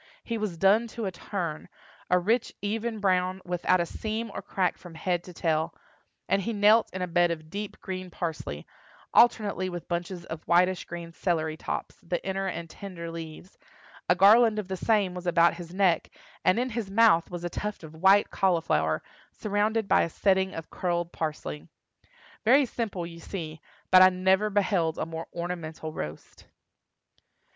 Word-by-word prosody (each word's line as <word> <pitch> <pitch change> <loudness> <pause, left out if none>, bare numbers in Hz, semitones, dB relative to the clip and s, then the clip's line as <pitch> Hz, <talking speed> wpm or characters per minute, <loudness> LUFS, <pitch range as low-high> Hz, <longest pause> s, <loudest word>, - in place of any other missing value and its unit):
He 230 - -3
was 205 -6 -3
done 205 +6 +4
to 230 - -2
a 190 - -2
turn—a 175 -1 -4
rich, 220 +7 0
even 220 +2 -2
brown, 185 -2 +1
without 180 +1 +1
a 170 - +1
seam 220 +4 -4
or - - -5
crack 185 -2 -1
from 175 -2 -12
head 175 +1 -1
to 180 - -9
tail, 160 -1 0 0.5
and 195 - +2
he 230 +5 -2
knelt 215 +2 +5
in 185 0 -3
a - - -2
bed 175 0 +3
of 155 -2 -5
deep 205 0 -5
green 185 -1 -5
parsley, 160 - -5 0.5
alternately 210 -5 +4
with 175 -2 -7
bunches 175 0 -4
of 160 -1 -6
whitish 180 +1 +3
green 170 -1 -7
celery 160 -2 -1
tops - - -5
(the 175 +1 -2
inner 195 0 -1
and 170 -2 -4
tender 170 -1 -8
leaves); 165 +2 -9 0.5
a 180 - +6
garland 215 +4 +6
of 210 -3 -3
the 190 - -2
same 200 -2 +1
was 180 0 -6
about 170 0 +4
his 170 -1 -9
neck, 185 -3 +2 0.3
and 185 - +4
in 250 +1 0
his 225 -3 -3
mouth 205 -5 +4
was 175 -1 -6
a 175 - -2
tuft 210 0 -4
of 155 -1 -10
white 190 +5 +4
cauliflower, 80 - +1 0.3
surrounded 215 +1 0
by - - +4
a - - 0
setting 190 +2 +1
of 165 - -7
curled 175 -1 -1
parsley. 80 - -4 0.8
Very 265 +5 +5
simple, 215 -8 -3
you 170 0 -9
see; 160 -4 -6 0.3
but 185 0 +9
I 185 - +9
never 190 +3 +2
beheld 190 -5 +1
a - - -1
more 165 0 -6
ornamental 165 -2 -5
roast. 75 - -8
180 Hz, 170 wpm, -27 LUFS, 170-205 Hz, 0.8 s, but